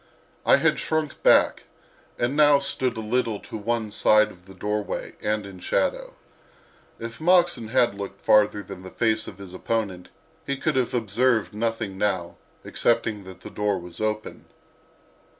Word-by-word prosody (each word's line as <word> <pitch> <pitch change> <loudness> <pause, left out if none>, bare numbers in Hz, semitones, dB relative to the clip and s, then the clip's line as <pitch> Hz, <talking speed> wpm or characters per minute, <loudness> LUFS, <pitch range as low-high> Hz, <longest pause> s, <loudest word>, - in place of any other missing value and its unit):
I - - +8
had - - +2
shrunk 155 -2 -2
back - - +4 0.5
and 120 +4 0
now 145 -1 +6
stood 130 -3 -1
a - - -3
little 115 -1 0
to - - -10
one 110 0 -2
side 105 0 +4
of 90 +1 -18
the 95 - -13
doorway 105 +2 -3
and 105 -1 -1
in 95 -2 -10
shadow. - - -1 0.8
If 115 +4 -8
Moxon 175 -8 +3
had 120 0 +2
looked 100 0 -8
farther 105 -1 +4
than 95 -1 -9
the 95 - -9
face 110 +1 0
of 95 - -9
his 100 -2 -10
opponent 95 -3 -3 0.3
he 140 0 -3
could 155 +1 -1
have 130 -1 0
observed 115 +1 +1
nothing 110 -3 -2
now, 95 -4 -1 0.3
except 120 - +1
that 100 -4 -6
the - - -9
door 105 -1 0
was 90 +1 -9
open. 110 0 -3
110 Hz, 160 wpm, -25 LUFS, 100-125 Hz, 0.8 s, I